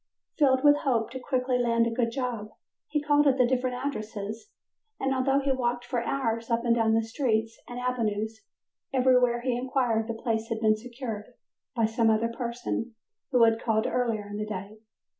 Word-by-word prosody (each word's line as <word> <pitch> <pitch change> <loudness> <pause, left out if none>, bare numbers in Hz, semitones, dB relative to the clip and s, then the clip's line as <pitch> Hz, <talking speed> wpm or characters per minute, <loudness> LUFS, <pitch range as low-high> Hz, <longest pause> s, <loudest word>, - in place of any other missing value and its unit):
Filled 260 -3 +4
with 290 0 +7
hope 235 -6 0
to 260 - -5
quickly 250 -1 0
land 230 -1 +2
a 230 - -1
good 230 0 0
job, 235 -4 -3 0.4
he 300 -1 -1
called 295 0 +4
at 270 -1 +4
the 250 - +5
different 250 0 0
addresses, 220 - -5 0.5
and, 270 0 0
although 270 +1 +2
he 280 0 +1
walked 245 -2 -1
for 245 -1 -1
hours 230 -4 -1
up 230 +1 0
and 235 - +4
down 225 -1 +3
the 225 - +2
streets 225 -1 -1
and 245 0 -6
avenues, 220 -3 -2 0.5
everywhere 250 -2 +3
he 250 0 0
inquired 245 -3 0
the 230 - -3
place 225 -1 -2
had 225 - -2
been 215 -1 +4
secured 230 -2 -6 0.5
by 230 - +3
some 225 +1 +2
other 220 +1 +2
person 235 -1 -4 0.3
who 250 -3 +4
had 225 0 +4
called 220 -2 +1
earlier 230 -4 -1
in 205 0 -6
the 210 - -2
day. 210 +1 -6
235 Hz, 185 wpm, -27 LUFS, 225-255 Hz, 0.5 s, with